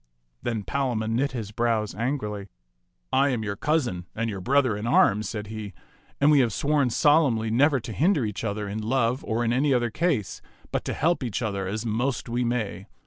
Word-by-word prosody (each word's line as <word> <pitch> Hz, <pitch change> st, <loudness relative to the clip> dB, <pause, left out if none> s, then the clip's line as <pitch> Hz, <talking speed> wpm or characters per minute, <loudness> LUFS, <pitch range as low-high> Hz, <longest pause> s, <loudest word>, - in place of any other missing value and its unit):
Then 115 Hz, -3 st, -2 dB
Palamon 115 Hz, -3 st, -1 dB
knit 135 Hz, +3 st, 0 dB
his 110 Hz, -5 st, -5 dB
brows 110 Hz, -1 st, 0 dB
angrily. 105 Hz, -5 st, -3 dB, 0.4 s
" -, -, -48 dB, 0.3 s
I 135 Hz, +2 st, +4 dB
am 120 Hz, -4 st, -1 dB
your 100 Hz, -1 st, -3 dB
cousin 120 Hz, -, -1 dB
and 115 Hz, 0 st, -1 dB
your 95 Hz, -2 st, -5 dB
brother 130 Hz, 0 st, +2 dB
in 105 Hz, +3 st, -4 dB
arms," 105 Hz, -3 st, +3 dB
said 105 Hz, -1 st, -4 dB
he; 105 Hz, -2 st, -7 dB, 0.5 s
"and 145 Hz, +2 st, +5 dB
we 145 Hz, -, +6 dB
have 120 Hz, -4 st, +3 dB
sworn 145 Hz, +3 st, +1 dB
solemnly 135 Hz, -6 st, +3 dB
never 135 Hz, +4 st, +4 dB
to 115 Hz, -, -6 dB
hinder 155 Hz, -, +2 dB
each 105 Hz, 0 st, -4 dB
other 105 Hz, -1 st, -2 dB
in 105 Hz, +2 st, -4 dB
love 120 Hz, +2 st, 0 dB
or 115 Hz, +1 st, -1 dB
in 115 Hz, -, +1 dB
any 135 Hz, +1 st, +2 dB
other 120 Hz, -2 st, 0 dB
case, 140 Hz, -, -1 dB, 0.3 s
but -, -, -1 dB
to -, -, -2 dB
help 170 Hz, +2 st, +1 dB
each 120 Hz, -1 st, -2 dB
other 100 Hz, -3 st, -2 dB
as 110 Hz, +4 st, -3 dB
most 120 Hz, +4 st, -1 dB
we 120 Hz, +1 st, -1 dB
may. 110 Hz, -5 st, -2 dB
115 Hz, 200 wpm, -26 LUFS, 105-135 Hz, 0.5 s, we